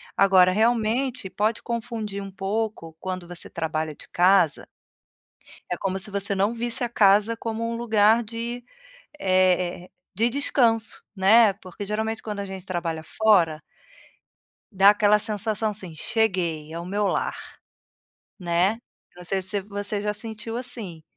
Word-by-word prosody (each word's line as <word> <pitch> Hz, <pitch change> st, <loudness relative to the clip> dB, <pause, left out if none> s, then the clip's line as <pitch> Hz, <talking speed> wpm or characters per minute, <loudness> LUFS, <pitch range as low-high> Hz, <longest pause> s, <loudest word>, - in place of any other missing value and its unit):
Agora, 190 Hz, -2 st, +5 dB
realmente 230 Hz, +1 st, +1 dB
pode 215 Hz, +4 st, -1 dB
confundir 225 Hz, -4 st, -4 dB
um 195 Hz, -, -8 dB
pouco 195 Hz, -4 st, -3 dB
quando 185 Hz, -1 st, -5 dB
você 175 Hz, -1 st, -7 dB
trabalha 155 Hz, -1 st, -3 dB
de -, -, -11 dB
casa 180 Hz, -2 st, +3 dB, 1.1 s
é 180 Hz, -, -1 dB
como 190 Hz, +1 st, -2 dB
se 200 Hz, +2 st, -2 dB
você 200 Hz, 0 st, -1 dB
não 200 Hz, +4 st, +1 dB
visse 240 Hz, +2 st, -1 dB
a -, -, -2 dB
casa 210 Hz, 0 st, +4 dB
como 230 Hz, 0 st, -3 dB
um 230 Hz, -, -3 dB
lugar 225 Hz, -1 st, +3 dB
de 235 Hz, +2 st, -5 dB, 0.5 s
eh 185 Hz, -3 st, +2 dB
eh, -, -, -27 dB, 0.2 s
de 225 Hz, +5 st, +2 dB
descanso, 235 Hz, -4 st, +1 dB
né. 210 Hz, +3 st, +6 dB
Porque 190 Hz, 0 st, -9 dB
geralmente 220 Hz, +2 st, -2 dB
quando 210 Hz, -2 st, -5 dB
a -, -, -3 dB
gente 190 Hz, -1 st, -8 dB
trabalha 170 Hz, -3 st, -3 dB
fora 170 Hz, -5 st, +2 dB, 1.1 s
dá 195 Hz, +1 st, +7 dB
aquela 210 Hz, 0 st, +4 dB
sensação, 215 Hz, 0 st, -1 dB
assim: 190 Hz, -5 st, -8 dB
"Cheguei, 170 Hz, -7 st, -1 dB
é 165 Hz, -, -5 dB
o 170 Hz, -, -7 dB
meu 205 Hz, +2 st, 0 dB
lar.", -, -, -1 dB, 1.0 s
né. 180 Hz, +4 st, +1 dB, 0.4 s
Não 180 Hz, -, -12 dB
sei 190 Hz, +2 st, -2 dB
se 190 Hz, +2 st, -3 dB
você 205 Hz, +1 st, -4 dB
já 210 Hz, 0 st, -2 dB
sentiu 225 Hz, +1 st, -5 dB
assim, 220 Hz, -10 st, -5 dB
205 Hz, 145 wpm, -24 LUFS, 185-225 Hz, 1.1 s, dá